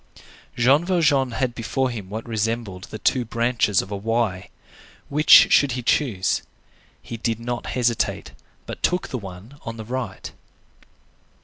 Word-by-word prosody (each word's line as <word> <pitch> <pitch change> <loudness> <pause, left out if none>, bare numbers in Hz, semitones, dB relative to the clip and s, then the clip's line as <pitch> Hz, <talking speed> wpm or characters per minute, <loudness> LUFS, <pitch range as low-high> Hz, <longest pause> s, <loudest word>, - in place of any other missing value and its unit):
Jean 135 +6 +4
Valjean 155 -7 +2
had 125 +1 -2
before 125 +2 -1
him 105 -5 -7
what 110 +3 -6
resembled 110 -4 -3
the 110 - -8
two 125 +4 +1
branches 115 -3 +1
of 95 - -12
a - - -2
Y. 105 -2 -1 0.6
Which 150 +2 +7
should 140 -4 +4
he 125 0 -4
choose? 115 -8 +1 0.6
He 115 - -7
did 115 0 -2
not 120 +1 -4
hesitate, 120 -2 0 0.3
but - - -8
took 180 0 0
the 130 - -3
one 100 +8 -11
on 115 0 -7
the 110 - -7
right. 125 -4 -5
115 Hz, 145 wpm, -23 LUFS, 110-130 Hz, 0.6 s, Which